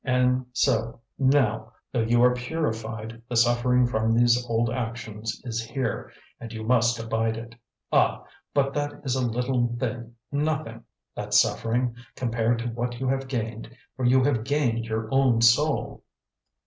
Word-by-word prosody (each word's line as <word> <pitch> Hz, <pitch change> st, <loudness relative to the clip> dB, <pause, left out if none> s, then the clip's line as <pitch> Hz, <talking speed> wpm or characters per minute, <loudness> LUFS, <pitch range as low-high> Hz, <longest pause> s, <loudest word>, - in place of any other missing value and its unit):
And 125 Hz, -1 st, +2 dB
so, 115 Hz, -3 st, +1 dB, 0.2 s
now, 115 Hz, -5 st, +2 dB, 0.2 s
though 120 Hz, -, +1 dB
you 120 Hz, +2 st, +3 dB
are 125 Hz, 0 st, +6 dB
purified, 115 Hz, -5 st, -4 dB
the 125 Hz, -, -3 dB
suffering 120 Hz, +1 st, +3 dB
from 115 Hz, -1 st, +1 dB
these 120 Hz, +1 st, +4 dB
old 115 Hz, 0 st, +1 dB
actions 115 Hz, -2 st, -4 dB
is 115 Hz, -2 st, -2 dB
here, 115 Hz, -1 st, -3 dB, 0.3 s
and 115 Hz, -1 st, -8 dB
you 110 Hz, -1 st, -6 dB
must 120 Hz, 0 st, +3 dB
abide 115 Hz, 0 st, -1 dB
it. 115 Hz, 0 st, -8 dB, 0.4 s
Ah, -, -, +2 dB, 0.3 s
but 135 Hz, -1 st, +1 dB
that 145 Hz, 0 st, -2 dB
is 130 Hz, -, -1 dB
a 130 Hz, -1 st, 0 dB
little 120 Hz, 0 st, 0 dB
thing, 120 Hz, -1 st, -4 dB, 0.2 s
nothing! 145 Hz, -5 st, -2 dB, 0.3 s
that -, -, -3 dB
suffering 120 Hz, +1 st, +2 dB, 0.2 s
compared 115 Hz, -1 st, 0 dB
to 120 Hz, -, -2 dB
what 120 Hz, +1 st, -3 dB
you 130 Hz, -, -2 dB
have 135 Hz, 0 st, -1 dB
gained, 115 Hz, -3 st, -4 dB, 0.3 s
for 130 Hz, -, -5 dB
you 130 Hz, +1 st, +4 dB
have 125 Hz, -5 st, +1 dB
gained 120 Hz, -4 st, 0 dB
your 110 Hz, 0 st, -2 dB
own 135 Hz, -4 st, +4 dB
soul!" 130 Hz, +6 st, +2 dB
120 Hz, 155 wpm, -26 LUFS, 115-130 Hz, 0.4 s, are